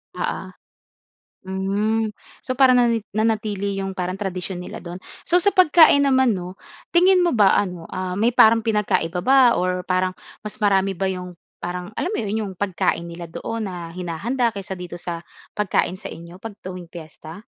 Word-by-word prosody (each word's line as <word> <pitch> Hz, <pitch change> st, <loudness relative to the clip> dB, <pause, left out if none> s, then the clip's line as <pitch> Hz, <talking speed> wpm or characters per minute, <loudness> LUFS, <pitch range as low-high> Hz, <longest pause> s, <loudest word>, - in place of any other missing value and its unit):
Oo, -, -, -3 dB, 0.9 s
hmm. 200 Hz, +4 st, -1 dB, 0.3 s
So 255 Hz, -, -4 dB
parang 255 Hz, -1 st, +5 dB
nani 235 Hz, -3 st, +2 dB
nanatili 210 Hz, -2 st, -1 dB
'yong 195 Hz, 0 st, -3 dB
parang 185 Hz, -1 st, -3 dB
tradisyon 185 Hz, -2 st, -4 dB
nila -, -, -8 dB
do'n. 175 Hz, 0 st, -8 dB, 0.3 s
So 345 Hz, -, +3 dB
sa 405 Hz, -, +4 dB
pagkain 320 Hz, -5 st, +6 dB
naman 260 Hz, -2 st, +4 dB
'no 180 Hz, -2 st, -5 dB, 0.4 s
tingin 365 Hz, +2 st, +6 dB
mo 345 Hz, -6 st, +2 dB
ba 205 Hz, -3 st, +5 dB
ano 180 Hz, -4 st, -3 dB
ah 185 Hz, -1 st, -3 dB
may 225 Hz, +5 st, +2 dB
parang 225 Hz, -1 st, +5 dB
pinagkaiba 210 Hz, -6 st, 0 dB
ba 255 Hz, +3 st, +5 dB
or 180 Hz, 0 st, -1 dB
parang 185 Hz, 0 st, 0 dB, 0.2 s
mas 210 Hz, -1 st, -8 dB
marami 195 Hz, -1 st, +2 dB
ba 190 Hz, +1 st, -1 dB
'yong 180 Hz, -1 st, -7 dB, 0.2 s
parang 180 Hz, +2 st, -5 dB
alam 360 Hz, -, -1 dB
mo -, -, -2 dB
'yon 210 Hz, +1 st, -2 dB
'yong 190 Hz, -, -7 dB
pagkain 180 Hz, -3 st, -1 dB
nila 170 Hz, 0 st, -8 dB
doon 220 Hz, +6 st, -4 dB
na 175 Hz, -3 st, -7 dB
hinahanda 205 Hz, +8 st, -2 dB
kesa 195 Hz, -1 st, -5 dB
dito 180 Hz, -1 st, -7 dB
sa 175 Hz, -1 st, -5 dB, 0.3 s
pagkain 190 Hz, -2 st, 0 dB
sa -, -, -7 dB
inyo 170 Hz, +2 st, -11 dB
'pag 220 Hz, 0 st, -8 dB
tuwing 180 Hz, -2 st, -7 dB
fiesta? 160 Hz, +2 st, -11 dB
195 Hz, 170 wpm, -22 LUFS, 180-225 Hz, 0.9 s, pagkain